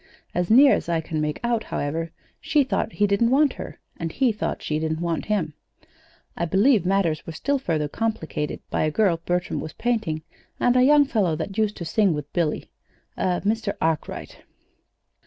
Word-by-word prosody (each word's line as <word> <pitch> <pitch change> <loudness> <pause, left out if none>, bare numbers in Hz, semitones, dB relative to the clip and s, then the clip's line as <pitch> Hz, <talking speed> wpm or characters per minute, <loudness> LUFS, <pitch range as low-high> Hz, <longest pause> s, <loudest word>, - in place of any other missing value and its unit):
As 180 0 -1
near 270 +5 +7
as - - -1
I 165 -1 +1
can 160 -1 -3
make 150 0 -2
out, 235 -2 0
however, 160 +3 -3 0.3
she 295 -2 +2
thought 255 -3 -2
he 205 - +2
didn't 205 +3 +2
want 280 +1 +4
her, - - -8 0.2
and 165 -1 -4
he 260 +3 +2
thought 215 -1 -3
she 155 0 -1
didn't 160 0 -2
want 170 -1 -2
him. 190 -8 -1 0.8
I 170 - -1
believe 195 - +3
matters 185 -5 +1
were 165 - -5
still 280 - 0
further 160 - -1
complicated 160 -5 -3
by - - 0
a 155 - +2
girl 170 -1 +1
Bertram 180 +1 -1
was 155 - -6
painting, 220 -10 -1 0.4
and 245 - +3
a 255 - +5
young 290 +2 +6
fellow 205 - +1
that 195 +5 -5
used 215 -1 0
to 170 - -5
sing 190 +1 +2
with 145 -1 -7
Billy 165 -4 -1 0.4
a 180 -1 0
Mr. 215 0 0
Arkwright. 160 -1 -2
185 Hz, 185 wpm, -24 LUFS, 160-225 Hz, 0.8 s, near